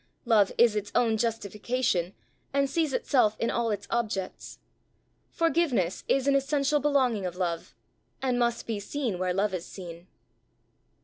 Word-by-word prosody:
Love 215 Hz, -5 st, +4 dB
is 235 Hz, -2 st, +5 dB
its 205 Hz, -1 st, -3 dB
own 230 Hz, -2 st, +3 dB
justification, 215 Hz, -3 st, -1 dB, 0.4 s
and 280 Hz, 0 st, +3 dB
sees 315 Hz, +1 st, 0 dB
itself 245 Hz, -6 st, +2 dB
in 230 Hz, -, 0 dB
all 235 Hz, -1 st, 0 dB
its 205 Hz, -1 st, -3 dB
objects: 215 Hz, -5 st, -3 dB, 0.7 s
forgiveness 320 Hz, -, +1 dB
is 270 Hz, -1 st, +2 dB
an 280 Hz, -, +4 dB
essential 280 Hz, +1 st, +2 dB
belonging 265 Hz, -8 st, +2 dB
of 175 Hz, -, -6 dB
love, 175 Hz, -2 st, -3 dB, 0.4 s
and 255 Hz, -2 st, 0 dB
must 235 Hz, -1 st, 0 dB
be 220 Hz, -3 st, -3 dB
seen 220 Hz, -2 st, -3 dB
where 185 Hz, 0 st, 0 dB
love 195 Hz, +2 st, 0 dB
is 175 Hz, -2 st, -4 dB
seen. 175 Hz, -2 st, -10 dB
230 Hz, 145 wpm, -28 LUFS, 195-265 Hz, 0.7 s, is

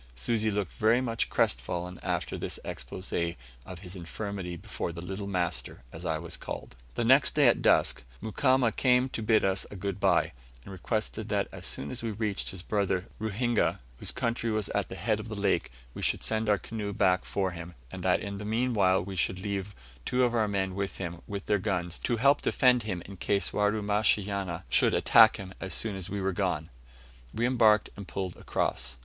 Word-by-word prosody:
Susi 110 Hz, -, 0 dB
looked 100 Hz, -3 st, -2 dB
very 110 Hz, +3 st, +3 dB
much 115 Hz, -3 st, -1 dB
crestfallen 85 Hz, +9 st, -1 dB
after -, -, -2 dB
this -, -, -4 dB
exposé 85 Hz, -2 st, -3 dB, 0.3 s
of 90 Hz, -2 st, -8 dB
his 90 Hz, -1 st, -7 dB
infirmity 95 Hz, 0 st, -5 dB
before 85 Hz, -, -5 dB
the 85 Hz, -, -8 dB
"little 95 Hz, +3 st, -5 dB
master," 90 Hz, -9 st, -2 dB
as 80 Hz, +2 st, -7 dB
I 80 Hz, -1 st, +1 dB
was 80 Hz, +1 st, -5 dB
called. -, -, -7 dB, 0.2 s
The -, -, 0 dB
next -, -, +5 dB
day -, -, +6 dB
at -, -, +4 dB
dusk -, -, +3 dB, 0.2 s
Mukamba 130 Hz, +4 st, +2 dB
having 125 Hz, -1 st, +4 dB
come 130 Hz, -, -3 dB
to 115 Hz, -, -4 dB
bid 110 Hz, -1 st, +3 dB
us 95 Hz, 0 st, +1 dB
good 100 Hz, 0 st, -3 dB
bye, -, -, +3 dB, 0.3 s
and -, -, -10 dB
requested 110 Hz, +3 st, -3 dB
that 100 Hz, -1 st, 0 dB
as -, -, -6 dB
soon 70 Hz, -, -4 dB
as 125 Hz, -, -4 dB
we 115 Hz, -, -2 dB
reached 105 Hz, -1 st, -2 dB
his 95 Hz, -1 st, -6 dB
brother 95 Hz, -3 st, 0 dB
Ruhinga, 110 Hz, +2 st, +1 dB, 0.2 s
whose -, -, 0 dB
country 115 Hz, 0 st, -1 dB
was 110 Hz, -2 st, -1 dB
at 100 Hz, -2 st, -1 dB
the -, -, -6 dB
head 110 Hz, +1 st, 0 dB
of 110 Hz, +1 st, -7 dB
the 110 Hz, -, -4 dB
lake, 100 Hz, -9 st, +1 dB, 0.2 s
we -, -, -7 dB
would -, -, -9 dB
send 110 Hz, -1 st, +1 dB
our 105 Hz, -, +5 dB
canoe 105 Hz, +2 st, -5 dB
back 90 Hz, -1 st, +3 dB
for 95 Hz, -2 st, -1 dB
him, 85 Hz, 0 st, -8 dB, 0.2 s
and -, -, -6 dB
that -, -, +2 dB
in 100 Hz, 0 st, -5 dB
the -, -, -5 dB
meanwhile 105 Hz, -5 st, +2 dB
we 95 Hz, 0 st, -6 dB
should 90 Hz, 0 st, 0 dB
leave 100 Hz, 0 st, -4 dB, 0.3 s
two 125 Hz, -, +1 dB
of 120 Hz, -1 st, +2 dB
our 110 Hz, -2 st, +2 dB
men 95 Hz, -2 st, -1 dB
with 100 Hz, +1 st, -3 dB
him, 85 Hz, -2 st, -5 dB
with 100 Hz, -1 st, -5 dB
their 105 Hz, -1 st, +2 dB
guns, 90 Hz, -4 st, -2 dB
to 120 Hz, -, 0 dB
help 140 Hz, +5 st, +4 dB
defend 125 Hz, -2 st, +4 dB
him 95 Hz, -6 st, -4 dB
in 100 Hz, 0 st, -10 dB
case 100 Hz, 0 st, 0 dB
Warumashanya 105 Hz, -3 st, +1 dB
should -, -, +4 dB
attack 110 Hz, -1 st, +7 dB
him 95 Hz, -1 st, -8 dB
as 95 Hz, -, -4 dB
soon 110 Hz, -3 st, -1 dB
as 95 Hz, -3 st, -6 dB
we 100 Hz, -, -3 dB
were 95 Hz, 0 st, 0 dB
gone 90 Hz, -5 st, -1 dB, 0.6 s
we 115 Hz, +2 st, +1 dB
embarked 110 Hz, -4 st, +4 dB
and 100 Hz, -2 st, -8 dB
pulled 95 Hz, -2 st, -4 dB
across. 65 Hz, 0 st, -2 dB
100 Hz, 200 wpm, -29 LUFS, 90-110 Hz, 0.6 s, attack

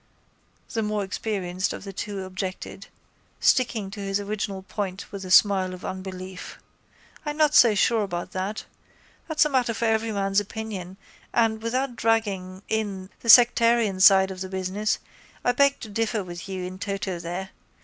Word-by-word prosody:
the 225 Hz, -, 0 dB
more 210 Hz, -1 st, -1 dB
experienced 190 Hz, -2 st, -2 dB
of -, -, -8 dB
the 195 Hz, -1 st, -8 dB
two 200 Hz, 0 st, -4 dB
objected, 185 Hz, 0 st, -6 dB, 0.5 s
sticking 230 Hz, -6 st, +2 dB
to 205 Hz, -, -8 dB
his 195 Hz, 0 st, -1 dB
original 200 Hz, -1 st, -4 dB
point 195 Hz, -2 st, -5 dB
with 200 Hz, -1 st, -6 dB
a 185 Hz, -, -7 dB
smile 185 Hz, -1 st, +4 dB
of 180 Hz, -, -11 dB
unbelief. 185 Hz, 0 st, -7 dB, 0.7 s
I'm 295 Hz, -1 st, -4 dB
not 305 Hz, -1 st, +3 dB
so 230 Hz, -7 st, +7 dB
sure 225 Hz, +3 st, +3 dB
about 175 Hz, -4 st, -4 dB
that. 190 Hz, +3 st, -4 dB, 0.6 s
That's 315 Hz, -2 st, +3 dB
a -, -, +1 dB
matter 250 Hz, -4 st, +1 dB
for 235 Hz, -, -1 dB
everyman's 215 Hz, -3 st, +1 dB
opinion 205 Hz, -3 st, -6 dB, 0.4 s
and, 220 Hz, -2 st, +2 dB
without 250 Hz, +2 st, -1 dB
dragging 200 Hz, -5 st, -1 dB
in 200 Hz, -4 st, -3 dB
the 230 Hz, -, -6 dB
sectarian 230 Hz, -3 st, +6 dB
side 190 Hz, 0 st, +7 dB
of 185 Hz, -1 st, -8 dB
the 190 Hz, -, -4 dB
business, 190 Hz, +3 st, -1 dB, 0.5 s
I 245 Hz, -, +4 dB
beg 280 Hz, +2 st, +3 dB
to 220 Hz, -, -7 dB
differ 220 Hz, 0 st, -1 dB
with 175 Hz, +1 st, -8 dB
you 190 Hz, -1 st, -4 dB
in 185 Hz, +1 st, -7 dB
toto 195 Hz, -3 st, -3 dB
there. 175 Hz, +3 st, -5 dB
200 Hz, 160 wpm, -25 LUFS, 190-225 Hz, 0.7 s, so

